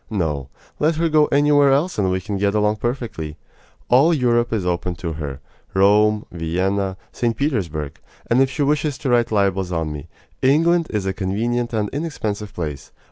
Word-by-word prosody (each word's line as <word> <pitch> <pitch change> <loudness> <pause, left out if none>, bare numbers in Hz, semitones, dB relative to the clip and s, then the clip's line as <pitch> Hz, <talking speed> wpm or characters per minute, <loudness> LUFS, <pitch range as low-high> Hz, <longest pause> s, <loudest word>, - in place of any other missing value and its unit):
No, 75 - -2 0.3
let 155 +2 +2
her 165 +1 +1
go 155 -1 +4
anywhere 145 0 +4
else 145 +1 +1
and 95 -2 +2
we 95 0 0
can 100 +1 -4
get 100 +1 +1
along 105 0 +2
perfectly. 110 - -4 0.5
All 145 +7 +5
Europe 120 -3 +2
is 105 -5 -1
open 90 0 -1
to 85 -1 -4
her 70 -3 -6 0.3
Rome, 105 +2 +4
Vienna, 95 +3 -1
St. 115 -2 -1
Petersburg; 85 - -2 0.3
and 120 +3 +3
if 135 - +3
she 145 +3 -1
wishes 145 0 0
to 135 - -2
write 120 -1 +2
libels 95 -3 +1
on 80 -3 -2
me, 75 -2 -8 0.3
England 165 +5 +3
is 105 -3 -2
a 95 - -1
convenient 115 +6 -1
and 110 -3 0
inexpensive 110 -9 -4
place. 75 -6 -6
105 Hz, 175 wpm, -21 LUFS, 90-135 Hz, 0.5 s, All